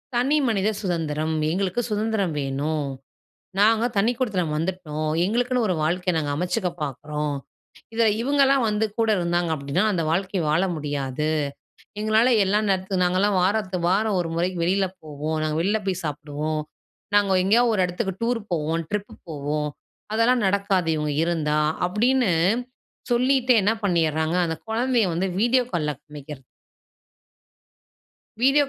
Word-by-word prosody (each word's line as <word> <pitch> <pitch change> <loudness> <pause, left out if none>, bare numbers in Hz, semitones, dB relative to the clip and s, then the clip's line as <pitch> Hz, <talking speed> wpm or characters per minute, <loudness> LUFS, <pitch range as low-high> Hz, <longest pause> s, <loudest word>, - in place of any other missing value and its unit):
தனி 270 +5 +2
மனித 210 -3 +1
சுதந்திரம். 160 -4 -1 0.2
"எங்களுக்கு 190 +6 0
சுதந்திரம் 210 -5 0
வேணும். 145 +2 -2 0.7
நாங்க 225 +2 +4
தனி 215 +4 +3
குடித்தனம் 185 -11 0
வந்துட்டோம். 155 -3 -3 0.2
எங்களுக்குன்னு 245 +3 +1
ஒரு 185 - +1
வாழ்க்கைய 180 +3 0
நாங்க 145 -2 -1
அமைச்சுக்க 180 +4 -1
பார்க்கிறோம். 150 +1 -3 0.6
இதில 230 0 +3
இவங்களாம் 275 -1 +3
வந்து 210 +1 +1
கூட 225 -1 +2
இருந்தாங்க 175 -1 0
அப்டின்னா, 140 +7 -1
அந்த 170 -5 0
வாழ்க்கை 185 +2 0
வாழ 155 +3 +3
முடியாது. 145 -1 -2 0.7
எங்களால 220 +3 +3 0.2
எல்லா 200 +2 +2
நேரத்து 190 -1 0
நாங்கலாம் 185 +2 +2
வாரத்துக்கு 185 -3 0
வாரம் 205 0 +2
1 170 - -2
முறைக்கு 180 +1 -1
வெளியில 190 +2 +2 0.2
போவோம். 155 +1 -3
நாங்க 155 0 -1
வெளியில 205 +5 +1
போய் 185 -2 -1
சாப்பிடுவோம். 150 +1 -3 0.6
நாங்க 195 -2 +3
எங்கேயாவது 230 +4 +4
ஒரு 190 - +2
இடத்துக்கு 190 +2 -3
டூர் 240 -1 0
போவோம், 165 +1 -1
ட்ரிப்பு 210 -1 -3 0.2
போவோம். 150 0 -2 0.5
அதெல்லாம் 235 +1 +3
நடக்காது, 195 -3 +1
இவங்க 150 -1 -1
இருந்தா." 155 -3 0 0.3
அப்டின்னு 240 +2 +2 0.8
சொல்லிட்டே 255 +1 +3
என்ன 210 - +3
பண்ணியர்றாங்க, 160 -2 +1
அந்த 160 - -2
குழந்தைய 235 0 +1
வந்து 180 +3 0
வீடியோ 250 +2 +4
கால்ல 155 -4 0
காமிக்கிறது 150 -2 -10 2.0
வீடியோ 275 +3 +5
185 Hz, 130 wpm, -24 LUFS, 155-220 Hz, 2.0 s, வீடியோ